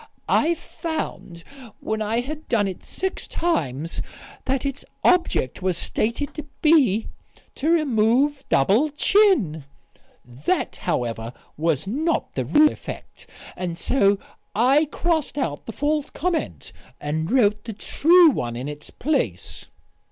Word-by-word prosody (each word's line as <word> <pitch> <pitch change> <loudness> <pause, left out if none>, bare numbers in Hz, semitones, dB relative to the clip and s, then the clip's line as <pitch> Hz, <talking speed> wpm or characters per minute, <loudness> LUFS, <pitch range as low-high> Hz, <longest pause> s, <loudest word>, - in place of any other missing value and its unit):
"I 335 +3 +3
found, 310 - -6 0.4
when 220 0 -3
I 220 +3 0
had 305 +4 -7
done 210 -4 +2
it 185 -2 -6
six 380 0 -4
times 160 - -1 0.4
that 270 +1 -1
its 275 -2 -3 0.2
object 340 - +2
was 185 -2 0
stated 235 +10 -2
to 305 - -7 0.2
be, 270 - +4 0.5
'To 300 - -1
remove 275 -2 +2
double 210 - +3
chin.' 295 - +3 0.6
That, 125 +4 -2
however, 115 -1 -2 0.2
was 160 -1 0
not 305 - -1
the - - -2
real 305 0 +5
effect. - - -10 0.3
And, 175 -2 -4
so 200 -4 +2 0.4
I 265 +8 +4
crossed 320 -1 -1
out 145 - -3
the - - -4
false 295 +4 -1
comment 345 0 -3 0.3
and 160 +3 -2
wrote 215 -4 +2
the 225 - -5
true 330 - +5
one 120 - -3
in 125 +3 -5
its 150 0 -8
place." 300 +2 -2
240 Hz, 130 wpm, -23 LUFS, -, 0.6 s, real